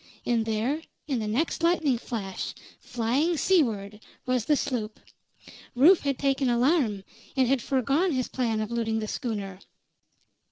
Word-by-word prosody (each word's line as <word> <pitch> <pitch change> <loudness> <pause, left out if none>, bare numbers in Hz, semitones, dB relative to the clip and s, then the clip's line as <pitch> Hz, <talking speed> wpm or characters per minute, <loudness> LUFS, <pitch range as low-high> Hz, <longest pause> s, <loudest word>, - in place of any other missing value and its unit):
And 230 -2 +1
there, 230 +8 0 0.3
in 270 -5 0
the 215 - -3
next 275 +11 -1
lightning 325 -7 +2
flash, 200 -6 -5 0.2
flying 265 +9 0
seaward, 225 - +1 0.3
was 255 -3 0
the 300 - +3
sloop. 220 -6 -3 0.8
Rufe 325 +9 +7
had 275 -2 -1
taken 275 -2 +1
alarm, 240 - +2 0.3
and 260 -1 +4
had 265 0 +2
foregone 275 +9 +1
his 255 -2 -1
plan 230 -4 -1
of 215 +1 -4
looting 225 -1 -1
the 215 -1 -3
schooner. 205 -7 -4
245 Hz, 145 wpm, -27 LUFS, 220-280 Hz, 0.8 s, Rufe